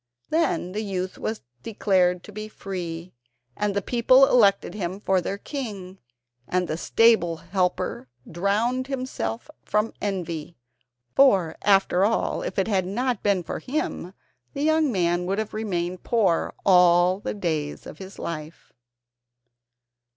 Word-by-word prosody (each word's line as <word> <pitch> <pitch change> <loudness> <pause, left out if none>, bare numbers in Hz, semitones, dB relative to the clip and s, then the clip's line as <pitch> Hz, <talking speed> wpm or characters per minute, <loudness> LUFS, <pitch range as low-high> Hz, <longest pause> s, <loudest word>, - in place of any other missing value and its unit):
Then 315 - +1
the 210 +3 -3
youth 190 -3 -4
was 220 0 -4 0.2
declared 180 - +1
to - - -11
be 215 +1 -6
free, 180 -4 -6 0.4
and 205 -1 -1
the 200 - 0
people 255 +4 +5
elected 205 -8 +3
him 190 -2 -4
for 190 -3 +1
their 195 +3 -3
king; 200 -8 -6 0.5
and 180 -1 0
the 155 - -2
stable 175 -2 +3
helper 180 -5 -2 0.2
drowned 215 +9 0
himself 255 -3 -4 0.2
from 210 +2 0
envy, 170 -5 -4 0.6
for, 195 -12 +4
after 195 -2 +3
all, 225 +3 +1
if - - -5
it 195 - +1
had 190 -4 +1
not 240 +3 -1
been 200 -3 +1
for 160 - -5
him 255 - -4 0.4
the 285 - -2
young 315 -2 +3
man 175 -3 0
would 195 +2 -1
have 220 0 -3
remained 185 -5 -2
poor 210 -8 +1
all 180 0 +5
the - - -4
days 155 -7 -3
of - - -10
his 190 +1 -10
life. 155 -1 -7
195 Hz, 140 wpm, -25 LUFS, 180-220 Hz, 0.6 s, people